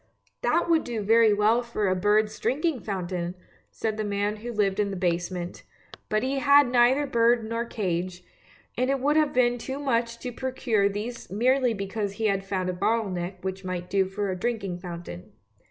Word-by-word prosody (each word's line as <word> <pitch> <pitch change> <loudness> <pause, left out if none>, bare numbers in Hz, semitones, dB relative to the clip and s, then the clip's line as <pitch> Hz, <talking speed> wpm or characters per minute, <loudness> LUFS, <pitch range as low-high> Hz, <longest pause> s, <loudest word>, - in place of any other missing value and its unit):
"That 330 +9 +2
would 330 -2 +3
do 230 -3 -3
very 225 +1 +5
well 210 +3 +3
for 235 -4 -2
a 185 - +2
bird's 210 +3 +2
drinking 295 0 0
fountain! 180 -3 -3 0.2
" - - -31
said 220 -1 -3
the 215 - -1
man 205 +1 -1
who 240 +3 -6
lived 205 -3 0
in 205 -1 +1
the 195 - -4
basement; 175 0 -2 0.5
but 215 +2 +1
he 270 +1 0
had 280 -2 +5
neither 250 +4 +4
bird 235 -3 +2
nor 230 +1 -2
cage, 185 -5 -3 0.5
and 255 +2 0
it 275 0 +1
would 290 +3 +2
have 310 -2 +3
been 245 -1 +2
too 265 +3 -5
much 235 -4 0
to 250 - -4
procure 240 -5 0
these 215 +4 -5
merely 250 +3 +2
because 200 +1 -3
he 220 +2 -3
had 195 -2 +1
found 190 -2 -2
a 185 - -1
bottle 215 +3 0
neck 180 +1 -5
which 190 0 -4
would 180 -1 -4
do 195 -1 +2
for 195 +1 -3
a - - -2
drinking 195 -3 -3
fountain. 170 - -8
215 Hz, 195 wpm, -26 LUFS, 190-240 Hz, 0.5 s, very